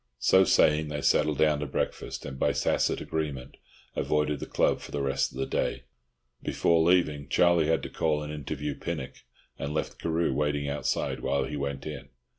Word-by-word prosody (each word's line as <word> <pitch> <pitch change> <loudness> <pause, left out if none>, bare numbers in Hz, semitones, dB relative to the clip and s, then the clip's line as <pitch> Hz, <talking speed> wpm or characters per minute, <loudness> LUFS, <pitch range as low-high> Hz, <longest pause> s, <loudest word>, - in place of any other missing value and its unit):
So 95 +9 +5
saying, 75 -2 +4
they 75 -1 -4
settled 75 -2 +3
down 75 -1 +3
to 75 - -3
breakfast, 65 - -3
and 65 -2 -7
by - - +2
tacit - - +1
agreement 70 -5 -4 0.4
avoided 75 -1 0
the - - -6
club - - +2
for - - -10
the 70 -1 -2
rest 70 0 0
of 65 - -11
the 65 - -1
day. 65 - -1 0.6
Before 85 -1 +2
leaving, 80 -5 +2
Charlie 85 -1 +4
had 80 0 +1
to - - -5
call 75 -2 0
and 75 0 -6
interview 75 0 -4
Pinnock, - - -5 0.4
and 70 +2 -3
left - - -3
Carew 80 -3 0
waiting 75 0 0
outside 70 +1 -1
while 70 - 0
he 75 - -5
went 70 -1 -3
in. 70 -4 -7
75 Hz, 185 wpm, -28 LUFS, 70-80 Hz, 0.6 s, So